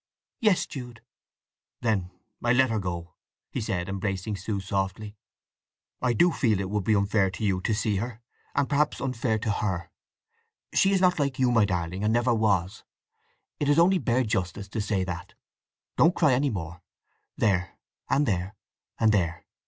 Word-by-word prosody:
"Yes, 210 Hz, -5 st, +3 dB
Jude." 125 Hz, -4 st, -8 dB, 0.8 s
"Then 105 Hz, -6 st, 0 dB, 0.3 s
I'll 120 Hz, +1 st, +3 dB
let 130 Hz, -1 st, +4 dB
her 110 Hz, -, 0 dB
go," 85 Hz, -3 st, -5 dB, 0.5 s
said 90 Hz, -5 st, -2 dB
he, -, -, -6 dB
embracing 100 Hz, +1 st, -2 dB
Sue 100 Hz, +1 st, -3 dB
softly. 95 Hz, +2 st, -3 dB, 0.9 s
"I 125 Hz, -1 st, +2 dB
do 175 Hz, +9 st, +4 dB
feel 115 Hz, -8 st, +2 dB
that -, -, -2 dB
it 95 Hz, -, -5 dB
would 105 Hz, -3 st, -1 dB
be 110 Hz, -, +3 dB
unfair 100 Hz, -1 st, +2 dB
to 95 Hz, +3 st, -7 dB
you 95 Hz, -2 st, +1 dB
to 110 Hz, -, 0 dB
see 105 Hz, -1 st, 0 dB
her, 115 Hz, +2 st, -4 dB, 0.4 s
and 140 Hz, -1 st, +2 dB
perhaps 145 Hz, -2 st, +1 dB
unfair 120 Hz, -3 st, -1 dB
to 110 Hz, 0 st, -1 dB
her. 95 Hz, -5 st, -2 dB, 0.8 s
She 195 Hz, -, +4 dB
is 190 Hz, -2 st, +2 dB
not 180 Hz, -3 st, +3 dB
like 140 Hz, -2 st, 0 dB
you, 130 Hz, -2 st, +3 dB
my 115 Hz, -3 st, +4 dB
darling, 90 Hz, 0 st, -2 dB
and 105 Hz, -, +2 dB
never 120 Hz, +1 st, +3 dB
was: 100 Hz, -4 st, +1 dB, 0.8 s
it 145 Hz, -, 0 dB
is 145 Hz, -, +4 dB
only 180 Hz, +3 st, +5 dB
bare 130 Hz, -3 st, +1 dB
justice 100 Hz, -2 st, -2 dB
to 110 Hz, -, -2 dB
say 100 Hz, -2 st, 0 dB
that. 90 Hz, -2 st, -6 dB, 0.6 s
Don't 170 Hz, +2 st, +5 dB
cry 155 Hz, -6 st, +4 dB
any 140 Hz, +3 st, +2 dB
more. 85 Hz, -4 st, -5 dB, 0.6 s
There; 90 Hz, -5 st, +1 dB, 0.3 s
and 145 Hz, -, +3 dB
there; 95 Hz, -2 st, -1 dB, 0.4 s
and 110 Hz, -1 st, +4 dB
there!" 85 Hz, -4 st, 0 dB
105 Hz, 175 wpm, -27 LUFS, 95-125 Hz, 0.9 s, only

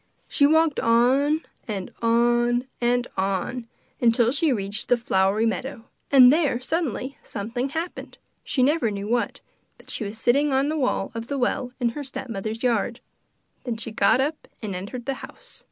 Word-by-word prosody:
She 285 Hz, -, +3 dB
walked 320 Hz, -1 st, +3 dB
on 265 Hz, +7 st, +3 dB, 0.3 s
and 195 Hz, -4 st, -4 dB
on 240 Hz, +1 st, +2 dB, 0.2 s
and 245 Hz, +1 st, +2 dB
on, 195 Hz, +5 st, -2 dB, 0.4 s
till 235 Hz, 0 st, +3 dB
she 305 Hz, +2 st, +2 dB
reached 205 Hz, -3 st, -3 dB
the 245 Hz, -, +5 dB
flowery 200 Hz, -1 st, +1 dB
meadow, 230 Hz, +3 st, -3 dB, 0.2 s
and 260 Hz, -2 st, +8 dB
there, 295 Hz, -7 st, +1 dB
suddenly, 275 Hz, -, -3 dB
something 235 Hz, +6 st, -4 dB
happened, 325 Hz, +4 st, -5 dB, 0.3 s
she 255 Hz, -, 0 dB
never 290 Hz, -3 st, +2 dB
knew 200 Hz, 0 st, -4 dB
what, 240 Hz, +2 st, -1 dB, 0.4 s
but -, -, -10 dB
she -, -, -3 dB
was 210 Hz, +1 st, -6 dB
sitting 280 Hz, +6 st, +2 dB
on 270 Hz, +2 st, +2 dB
the 310 Hz, -, -1 dB
wall 270 Hz, -5 st, 0 dB
of 230 Hz, 0 st, -6 dB
the 280 Hz, -, -2 dB
well 250 Hz, 0 st, -1 dB
in 240 Hz, -2 st, +2 dB
her 290 Hz, +5 st, -6 dB
stepmother's 225 Hz, -4 st, -5 dB
yard. 235 Hz, 0 st, 0 dB, 0.6 s
Then 235 Hz, -3 st, -3 dB
she 230 Hz, 0 st, -5 dB
got 210 Hz, +2 st, +3 dB
up 295 Hz, +4 st, -2 dB
and 210 Hz, -4 st, -5 dB
entered 205 Hz, +7 st, -6 dB
the 275 Hz, -, -1 dB
house. -, -, -10 dB
245 Hz, 170 wpm, -24 LUFS, 225-275 Hz, 0.6 s, and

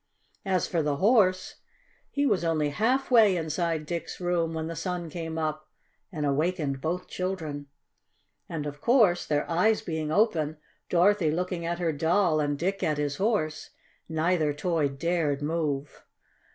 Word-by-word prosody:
As 185 Hz, -3 st, +1 dB
for 170 Hz, -, 0 dB
the 150 Hz, -1 st, 0 dB
Horse, 185 Hz, -, +2 dB, 0.5 s
he 285 Hz, 0 st, 0 dB
was 195 Hz, -10 st, +2 dB
only 155 Hz, -3 st, +1 dB
half 250 Hz, -, 0 dB
way 215 Hz, -6 st, +6 dB
inside 160 Hz, -1 st, -1 dB
Dick's 170 Hz, +1 st, -5 dB
room 175 Hz, -2 st, 0 dB
when 160 Hz, 0 st, -2 dB
the 165 Hz, +1 st, -5 dB
sun 170 Hz, 0 st, -4 dB
came 165 Hz, -1 st, -5 dB
up 155 Hz, -1 st, -3 dB, 0.4 s
and 155 Hz, -5 st, -3 dB
awakened 145 Hz, -1 st, 0 dB
both 175 Hz, +4 st, -2 dB
children. 160 Hz, -6 st, -4 dB, 0.8 s
And 155 Hz, -3 st, -4 dB
of 145 Hz, 0 st, -6 dB
course, 220 Hz, -8 st, +3 dB
their 150 Hz, -1 st, 0 dB
eyes 210 Hz, +6 st, +2 dB
being 160 Hz, -2 st, -3 dB
open, 160 Hz, -6 st, +1 dB, 0.3 s
Dorothy 180 Hz, -1 st, +3 dB
looking 175 Hz, +1 st, -2 dB
at 170 Hz, 0 st, -1 dB
her 170 Hz, -2 st, 0 dB
Doll 165 Hz, +2 st, +2 dB
and 145 Hz, -1 st, 0 dB
Dick 190 Hz, +5 st, -1 dB
at 155 Hz, -1 st, 0 dB
his 145 Hz, -1 st, -2 dB
Horse, 195 Hz, -7 st, -1 dB, 0.4 s
neither 160 Hz, -1 st, +1 dB
toy 155 Hz, 0 st, 0 dB
dared 145 Hz, 0 st, -1 dB
move. 150 Hz, -3 st, -2 dB
165 Hz, 150 wpm, -27 LUFS, 150-185 Hz, 0.8 s, way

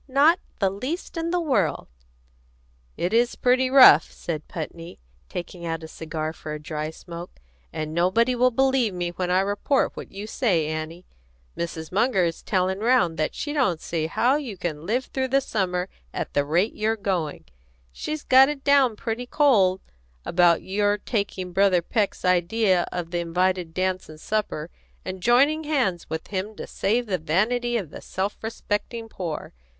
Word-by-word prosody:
"Not 290 Hz, +6 st, +4 dB, 0.2 s
the 195 Hz, -2 st, +1 dB
least 260 Hz, -, -5 dB
in 330 Hz, 0 st, -2 dB
the 355 Hz, +1 st, +1 dB
world!" 240 Hz, -, 0 dB, 1.1 s
"It 175 Hz, +4 st, -1 dB
is 235 Hz, +1 st, +3 dB
pretty 255 Hz, +1 st, +2 dB
rough," 255 Hz, -, +8 dB
said 155 Hz, -3 st, -5 dB
Putney, 165 Hz, +1 st, -7 dB, 0.3 s
taking 175 Hz, 0 st, -6 dB
out 165 Hz, -1 st, -3 dB
a -, -, -6 dB
cigar 160 Hz, -1 st, -5 dB
for 155 Hz, -1 st, -6 dB
a -, -, -6 dB
dry 150 Hz, 0 st, -4 dB
smoke; 170 Hz, -, -10 dB, 0.3 s
"and 155 Hz, 0 st, -4 dB
nobody 190 Hz, +9 st, +2 dB
will 250 Hz, +1 st, +4 dB
believe 260 Hz, -4 st, +2 dB
me 175 Hz, -1 st, -2 dB
when 180 Hz, +1 st, -3 dB
I 185 Hz, +1 st, +3 dB
report 205 Hz, +7 st, +1 dB
what -, -, -8 dB
you 200 Hz, +2 st, -7 dB
say, 200 Hz, -8 st, +1 dB
Annie. 155 Hz, +3 st, -5 dB, 0.5 s
Mrs. 165 Hz, -2 st, -5 dB
Munger 210 Hz, 0 st, +2 dB
is 170 Hz, -1 st, -2 dB
telling 190 Hz, -1 st, 0 dB
round 215 Hz, -8 st, +2 dB
that 155 Hz, -, -1 dB
she 290 Hz, -, -3 dB
don't 250 Hz, -, +1 dB
see 160 Hz, -1 st, -2 dB
how 250 Hz, -, +2 dB
you 250 Hz, -10 st, -6 dB
can 160 Hz, -2 st, -4 dB
live 245 Hz, +4 st, 0 dB
through 260 Hz, -1 st, -2 dB
the 270 Hz, +1 st, +3 dB
summer 185 Hz, -8 st, -1 dB, 0.3 s
at -, -, -4 dB
the 145 Hz, -, +2 dB
rate 175 Hz, +9 st, +1 dB
you're 220 Hz, +1 st, 0 dB
going. 180 Hz, -7 st, -2 dB, 0.5 s
She's 305 Hz, -, -5 dB
got 265 Hz, +1 st, +6 dB
it 290 Hz, -2 st, -5 dB
down 275 Hz, -5 st, +4 dB
pretty 230 Hz, +3 st, -4 dB
cold 205 Hz, -11 st, +3 dB, 0.4 s
about 170 Hz, -1 st, +3 dB
your 205 Hz, +1 st, +1 dB
taking 200 Hz, -4 st, -3 dB
Brother 190 Hz, -2 st, +3 dB
Peck's 205 Hz, 0 st, -1 dB
idea 180 Hz, +1 st, +2 dB
of 170 Hz, -2 st, -4 dB
the 175 Hz, -, -1 dB
invited 180 Hz, 0 st, 0 dB
dance 185 Hz, -1 st, -1 dB
and 155 Hz, 0 st, -11 dB
supper, 175 Hz, -6 st, -2 dB, 0.3 s
and 185 Hz, 0 st, -5 dB
joining 280 Hz, -, +3 dB
hands 250 Hz, -, 0 dB
with 160 Hz, 0 st, -5 dB
him 200 Hz, +2 st, -3 dB
to -, -, -6 dB
save 235 Hz, +5 st, 0 dB
the 190 Hz, -5 st, -1 dB
vanity 235 Hz, +10 st, +1 dB
of 180 Hz, -9 st, -5 dB
the -, -, -9 dB
self 195 Hz, +2 st, -3 dB
respecting 225 Hz, +1 st, -3 dB
poor. 175 Hz, -8 st, -5 dB
190 Hz, 170 wpm, -24 LUFS, 170-245 Hz, 1.1 s, rough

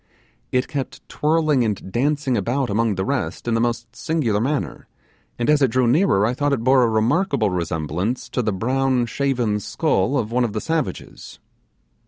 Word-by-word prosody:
It 125 Hz, 0 st, +1 dB
kept 135 Hz, -3 st, -5 dB
twirling 155 Hz, -3 st, +1 dB
and 105 Hz, -4 st, -3 dB
dancing 140 Hz, +2 st, 0 dB
about 120 Hz, +4 st, -1 dB
among 110 Hz, 0 st, +1 dB
the 95 Hz, -, -2 dB
rest 135 Hz, -2 st, -3 dB
in 120 Hz, -, +1 dB
the 115 Hz, -, +2 dB
most 120 Hz, 0 st, -2 dB
singular 120 Hz, -11 st, 0 dB
manner, 140 Hz, +4 st, -2 dB, 0.5 s
and 120 Hz, -, -1 dB
as 150 Hz, -1 st, +4 dB
it 135 Hz, -, +5 dB
drew 130 Hz, +2 st, +2 dB
nearer 125 Hz, -, +3 dB
I 120 Hz, -, +1 dB
thought 145 Hz, +2 st, 0 dB
it 120 Hz, -5 st, -1 dB
bore 130 Hz, +1 st, +5 dB
a 120 Hz, -, +3 dB
remarkable 115 Hz, -, +1 dB
resemblance 85 Hz, -, -2 dB
to 125 Hz, -, -1 dB
the 110 Hz, -, 0 dB
brown 130 Hz, +5 st, +1 dB
shaven 120 Hz, -4 st, 0 dB
skull 100 Hz, +5 st, 0 dB
of 115 Hz, -3 st, -2 dB
one 125 Hz, +1 st, +2 dB
of 115 Hz, -4 st, -2 dB
the 110 Hz, -, -1 dB
savages. 160 Hz, -, -4 dB
120 Hz, 180 wpm, -21 LUFS, 110-140 Hz, 0.5 s, it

